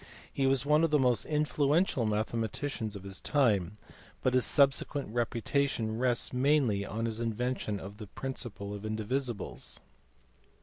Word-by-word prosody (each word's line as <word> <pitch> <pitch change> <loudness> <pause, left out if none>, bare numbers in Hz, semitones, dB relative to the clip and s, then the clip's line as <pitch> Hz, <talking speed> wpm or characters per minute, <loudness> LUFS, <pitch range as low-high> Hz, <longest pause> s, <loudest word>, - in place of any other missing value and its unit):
He 135 -1 +1
was 135 -1 +3
one 150 +2 +4
of 165 - +3
the 150 - +4
most 125 -4 +3
influential 150 - +1
mathematicians 110 +1 -2
of 100 - -8
his 95 -1 -3
time, 105 - +1 0.5
but 130 - +2
his 130 -1 +4
subsequent 140 -2 +2
reputation 120 -1 0
rests 125 -1 +1
mainly 125 -6 +2
on 110 +3 -3
his 115 -1 -1
invention 115 -2 -2
of 100 +2 -9
the 105 -2 -8
principle 105 -3 -5
of 100 - -6
indivisibles. 110 +1 -3
120 Hz, 140 wpm, -31 LUFS, 110-140 Hz, 0.5 s, one